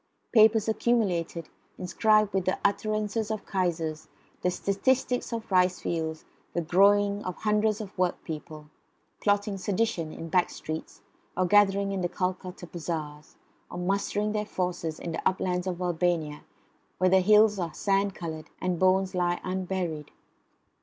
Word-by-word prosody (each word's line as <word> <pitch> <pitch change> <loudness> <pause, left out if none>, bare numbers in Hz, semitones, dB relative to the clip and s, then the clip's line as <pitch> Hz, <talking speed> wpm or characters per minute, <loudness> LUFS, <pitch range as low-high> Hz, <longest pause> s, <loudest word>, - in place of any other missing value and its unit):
Papers 220 -1 +5
accumulated, 190 -8 0 0.3
inscribed 215 +3 +2
with 190 -2 0
the 185 - +1
utterances 215 +1 0
of 215 -2 -4
Kaisers, 165 -5 -2 0.3
the 180 - +2
statistics 250 +8 0
of 230 -1 -4
ricefields, 170 -3 +1 0.3
the 175 - 0
growling 200 +4 +3
of 185 - -4
hundreds 210 0 +1
of 205 -3 -8
work 180 -1 +1
people, 155 -1 -8 0.5
plotting 205 -1 +1
sedition 185 -5 -1
in 165 - -7
back 180 +2 +2
streets, 155 +1 -7 0.4
or 185 - +2
gathering 200 +1 +4
in 195 -1 -2
the 175 - 0
Calcutta 180 0 -3
bazaars, 155 -3 -6 0.3
or - - -7
mustering 200 +3 0
their 210 0 -1
forces 180 -5 -3
in 170 - -5
the 165 - -3
uplands 180 -1 0
of 180 -1 -3
Albania, 170 -4 -1 0.6
where 185 0 +3
the 190 - +6
hills 210 +1 +5
are 170 -2 -2
sand 195 +3 0
coloured, 160 -2 -6
and 180 -2 -1
bones 185 0 +3
lie 175 -1 0
unburied. 185 -4 -3
185 Hz, 140 wpm, -27 LUFS, 175-205 Hz, 0.6 s, the